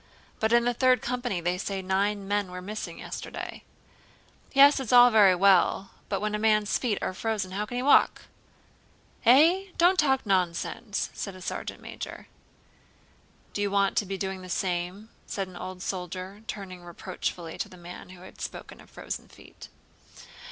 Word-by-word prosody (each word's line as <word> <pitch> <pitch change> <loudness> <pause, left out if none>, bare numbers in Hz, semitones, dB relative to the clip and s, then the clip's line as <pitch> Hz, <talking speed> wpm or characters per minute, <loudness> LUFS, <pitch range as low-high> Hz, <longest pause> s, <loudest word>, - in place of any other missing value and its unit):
"But 220 0 +1
in 235 0 +4
the 245 - +2
Third 255 +1 +4
Company 245 -6 -2
they 175 +2 -1
say 195 0 -3
nine 195 +1 0
men 205 -1 0
were 180 0 -7
missing 210 +4 -6
yesterday." - - -7 0.9
"Yes, 280 +1 +7
it's 260 -5 -4
all 245 0 +8
very 205 -4 +6
well, 190 +1 +3 0.2
but 195 - 0
when 210 0 -1
a 210 - -1
man's 215 -1 +2
feet 225 -6 0
are - - -1
frozen 205 -1 -2
how 205 +3 -3
can 245 - -5
he 250 - -1
walk?" 285 - +4 1.0
"Eh? 325 +10 +6
Don't 360 +2 +4
talk 265 -5 +3
nonsense!" 190 +3 -1
said 195 -2 -5
a - - -11
sergeant - - -5
major. - - -8 1.3
"Do 205 - -2
you 205 - +1
want 200 0 +2
to 205 - +1
be 195 0 -3
doing 190 -1 -4
the 185 - -10
same?" 180 +4 -2 0.2
said 195 -2 -3
an 185 - -13
old 185 +1 -7
soldier, 185 +2 -5
turning 185 -4 -7
reproachfully 170 -1 -5
to - - -3
the 185 - -13
man 175 +1 -10
who 185 -1 -13
had 185 - -13
spoken - - -7
of - - -18
frozen - - -6
feet. - - -14
200 Hz, 175 wpm, -27 LUFS, 185-230 Hz, 1.3 s, all